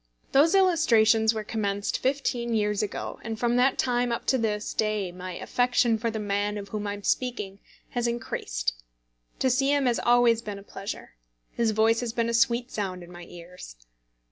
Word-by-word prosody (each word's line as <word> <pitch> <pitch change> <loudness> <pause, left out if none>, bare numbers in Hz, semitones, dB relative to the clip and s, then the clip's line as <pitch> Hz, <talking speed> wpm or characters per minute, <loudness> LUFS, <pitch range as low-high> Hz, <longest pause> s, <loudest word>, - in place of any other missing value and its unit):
Those 315 +7 +5
illustrations 230 - +4
were 220 -1 -4
commenced 205 -2 -2
fifteen 250 -3 -1
years 210 -1 +1
ago, 210 - -4
and 225 -1 -4
from 240 0 +1
that 255 +2 +3
time 245 -1 +1
up 235 - -3
to 260 - +2
this 210 -2 -2
day 215 -4 -1
my 180 +1 -7
affection 245 +1 +1
for 230 +1 -1
the 220 - -4
man 205 0 -1
of 200 -1 -7
whom 210 0 -4
I 205 - -2
am 205 - -11
speaking 210 -6 -2 0.3
has 240 -1 -1
increased. - - -2 0.6
To - - +1
see 270 +3 +2
him 285 -2 +2
has 240 -2 +2
always 240 -1 +4
been 210 -3 -6
a 200 - -11
pleasure. 195 - -8 0.3
His 235 -1 0
voice 220 +1 +3
has 240 -2 -3
been 230 0 0
a - - -1
sweet 235 +1 +2
sound 185 -4 -4
in 175 - -13
my 175 0 -10
ears. 175 - -11
225 Hz, 190 wpm, -26 LUFS, 205-240 Hz, 0.6 s, Those